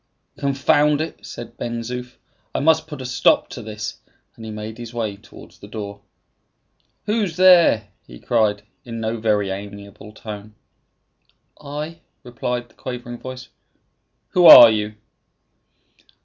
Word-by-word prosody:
"Confound 145 +2 +2
it!" 160 - -5
said 115 0 -10
Ben 120 0 -4
Zoof. 125 +1 -7 0.4
"I - - +1
must 160 +2 +2
put 150 -4 -8
a - - -7
stop 125 - +2
to - - -8
this;" 105 0 -7 0.4
and 115 - -12
he 110 - -7
made 110 +1 -7
his 120 0 -9
way 110 -4 -2
towards - - -16
the - - -12
door. 100 -1 -7 1.0
"Who's 210 -5 -1
there?" 170 - +5 0.2
he - - -12
cried, 105 -3 0 0.2
in 115 -1 -7
no 110 +1 -2
very 105 -3 0
amiable 100 +1 -9
tone. 105 -1 -10 1.1
"I." 150 +3 -6 0.2
replied 120 0 -4
the - - -25
quavering 120 -1 -7
voice. 130 -1 -9 0.8
"Who 175 -2 +5
are 115 -2 +12
you?" 105 0 -2
115 Hz, 135 wpm, -21 LUFS, 105-135 Hz, 1.1 s, are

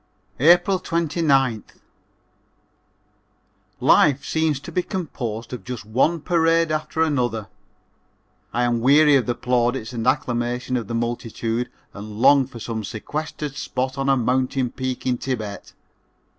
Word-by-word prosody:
April 175 +6 +5
29th. 150 - 0 2.0
Life 140 -2 +4
seems 160 -3 0
to 170 - -9
be 180 - +1
composed 125 - -5
of 120 -6 -6
just 125 -2 -6
one 135 +9 +1
parade 165 -1 +2
after 155 +1 0
another. 120 -9 -1 1.0
I 120 - 0
am 120 -1 +1
weary 145 +3 +6
of 130 -3 +2
the 120 - 0
plaudits 120 -1 0
and 115 0 -3
acclamation 125 +1 0
of 115 -4 -2
the 115 - -3
multitude 115 0 -2 0.2
and 105 +1 -8
long 135 +1 +5
for 125 - -11
some 110 0 -4
sequestered 145 +6 -5
spot 130 0 -3
on 135 0 0
a 135 - +4
mountain 130 +1 0
peak 130 -1 -4
in 125 -1 +1
Thibet. 110 -6 -5
130 Hz, 130 wpm, -22 LUFS, 120-150 Hz, 2.0 s, weary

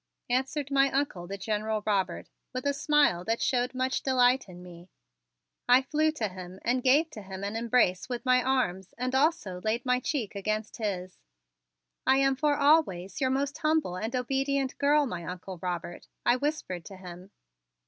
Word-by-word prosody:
answered 270 +3 -1
my 275 0 +4
Uncle, 270 -12 -2
the 200 +2 -5
General 215 +1 -2
Robert, 200 -3 0 0.3
with 255 +2 -4
a 285 - +2
smile 290 - +2
that 225 +4 -1
showed 250 0 0
much 255 0 0
delight 255 -3 +3
in 180 0 -11
me. 175 0 -13 0.8
I 250 +2 +7
flew 310 +3 +1
to 225 -8 -1
him 185 0 -9
and 250 +2 +1
gave 290 +6 +3
to 215 - -8
him 190 0 -8
an 200 +2 -3
embrace 230 -4 +1
with 245 +1 -4
my 255 0 +4
arms 195 -9 -1
and 255 +1 -2
also 265 - +1
laid 225 +4 -1
my 250 0 +2
cheek 255 -5 -2
against 215 +2 -3
his. 185 -4 -4 0.9
"I 265 - +5
am 270 0 +3
for 295 +1 +2
always 280 - +2
your 260 - +2
most 280 +3 -1
humble 310 - +1
and 220 +7 -3
obedient 270 +1 0
girl, 290 +1 +4
my 180 -9 -5
Uncle 180 +1 -7
Robert," 175 -1 -5 0.2
I 240 - +5
whispered 280 - -3
to 195 - -10
him. 180 0 -10
245 Hz, 175 wpm, -28 LUFS, 190-275 Hz, 0.9 s, I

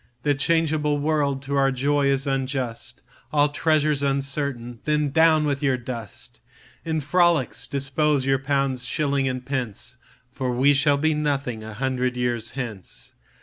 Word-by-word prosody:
The 145 - +3
changeable 150 0 +1
world 145 -2 0
to 140 +1 -3
our 135 0 +3
joy 140 +2 +1
is 135 0 +1
unjust, 130 -3 -3 0.3
All 145 -1 +3
treasure's 150 -1 +1
uncertain, 135 -3 -2
Then 150 -2 +1
down 160 0 +4
with 140 -1 -1
your 135 -3 +2
dust! 120 -4 -7 0.4
In 160 -1 -1
frolics 155 -7 +2
dispose 140 0 +1
your 135 0 +2
pounds, 135 -2 0
shillings, 140 -2 0
and 130 0 -4
pence, 125 -3 -3 0.3
For 130 -1 -2
we 135 +4 +4
shall 140 +1 +3
be 155 +2 +2
nothing 140 -6 -1
a 110 -1 -8
hundred 125 0 -1
years 120 -2 -1
hence. 115 -8 -6
140 Hz, 145 wpm, -24 LUFS, 130-150 Hz, 0.4 s, down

